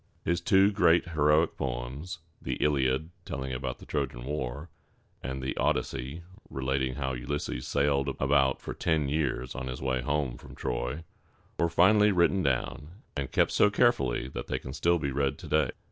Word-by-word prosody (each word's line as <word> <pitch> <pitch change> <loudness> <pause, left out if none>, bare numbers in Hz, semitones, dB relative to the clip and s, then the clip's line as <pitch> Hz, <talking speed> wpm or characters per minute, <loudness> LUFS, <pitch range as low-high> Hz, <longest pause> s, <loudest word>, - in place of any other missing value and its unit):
His 85 +1 +1
two 95 +3 +5
great 85 -3 +3
heroic 75 0 +3
poems 65 +7 -4 0.2
the - - -2
Iliad, 70 +2 +1
telling 65 -1 -4
all 65 - -2
about 65 -1 -4
the - - -13
Trojan 65 -4 -3
War, 70 +2 -4 0.5
and 65 +1 -4
the 65 - -1
Od´ys - - +2
sey, 70 +5 -6 0.3
relating 65 -1 -1
how 65 -2 -2
Ulysses 70 +1 -3
sailed 70 -1 +1
about 70 -1 +3
for - - -6
ten 80 -4 0
years 70 -4 -1
on 65 - -5
his 65 -1 -5
way 65 -1 0
home 70 -1 -1
from - - -12
Troy 60 +6 -3 0.6
were 85 - +3
finally 105 +5 +5
written 95 +1 +3
down, 75 - -2
and 70 -3 -3
kept - - +3
so 105 - +5
carefully 100 - +2
that - - -6
they - - -1
can 65 - -7
still 85 +4 +2
be 70 -4 -2
read 70 0 0
to - - -10
day. 80 -1 +2
70 Hz, 175 wpm, -29 LUFS, 65-80 Hz, 0.6 s, two